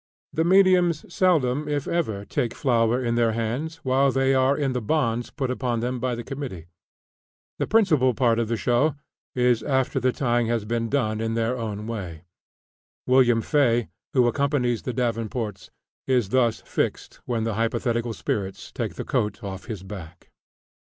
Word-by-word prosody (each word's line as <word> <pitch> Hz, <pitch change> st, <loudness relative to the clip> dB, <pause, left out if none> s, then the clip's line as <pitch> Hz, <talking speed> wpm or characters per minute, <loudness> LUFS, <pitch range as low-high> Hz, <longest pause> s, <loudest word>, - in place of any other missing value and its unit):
The 160 Hz, -, +1 dB
mediums 180 Hz, -3 st, +4 dB
seldom 150 Hz, -6 st, +2 dB
if 145 Hz, -2 st, -1 dB
ever 110 Hz, -13 st, -1 dB
take 120 Hz, -2 st, -2 dB
flour 120 Hz, -1 st, +2 dB
in 115 Hz, -, +1 dB
their 115 Hz, -1 st, +2 dB
hands 120 Hz, +9 st, -2 dB
while 135 Hz, +1 st, +3 dB
they 135 Hz, +1 st, +2 dB
are 130 Hz, +1 st, +3 dB
in 140 Hz, -3 st, 0 dB
the 125 Hz, -, -1 dB
bonds 120 Hz, -2 st, 0 dB
put 130 Hz, -4 st, -3 dB
upon 125 Hz, -2 st, -1 dB
them 125 Hz, +1 st, -2 dB
by 125 Hz, 0 st, -1 dB
the 120 Hz, -, -6 dB
committee. 125 Hz, -, -6 dB, 0.9 s
The -, -, 0 dB
principal 155 Hz, -, +3 dB
part 120 Hz, -3 st, +2 dB
of 115 Hz, -, 0 dB
the 115 Hz, +1 st, -1 dB
show 125 Hz, +7 st, +2 dB, 0.4 s
is 125 Hz, -2 st, +3 dB
after 130 Hz, +1 st, 0 dB
the 130 Hz, 0 st, +2 dB
tying 120 Hz, -3 st, 0 dB
has 115 Hz, -2 st, -1 dB
been 115 Hz, +1 st, -1 dB
done 110 Hz, -5 st, 0 dB
in 115 Hz, 0 st, -1 dB
their 115 Hz, +2 st, 0 dB
own 105 Hz, -3 st, -4 dB
way. 95 Hz, -8 st, -6 dB, 0.8 s
Wm. 125 Hz, -3 st, +4 dB
Fay, 120 Hz, -6 st, +2 dB, 0.2 s
who 125 Hz, -3 st, +4 dB
accompanies 125 Hz, -2 st, +1 dB
the 125 Hz, -, -4 dB
Davenports, 115 Hz, -3 st, -3 dB, 0.4 s
is 125 Hz, -6 st, +2 dB
thus 120 Hz, -2 st, +2 dB
fixed -, -, -3 dB
when 115 Hz, -2 st, -1 dB
the 115 Hz, 0 st, -1 dB
hypothetical 115 Hz, +1 st, -1 dB
spirits 95 Hz, -3 st, -4 dB
take -, -, -4 dB
the -, -, -5 dB
coat 105 Hz, 0 st, -1 dB
off 95 Hz, -2 st, -6 dB
his 105 Hz, -5 st, -6 dB
back. 90 Hz, -3 st, -10 dB
120 Hz, 165 wpm, -24 LUFS, 115-135 Hz, 0.9 s, mediums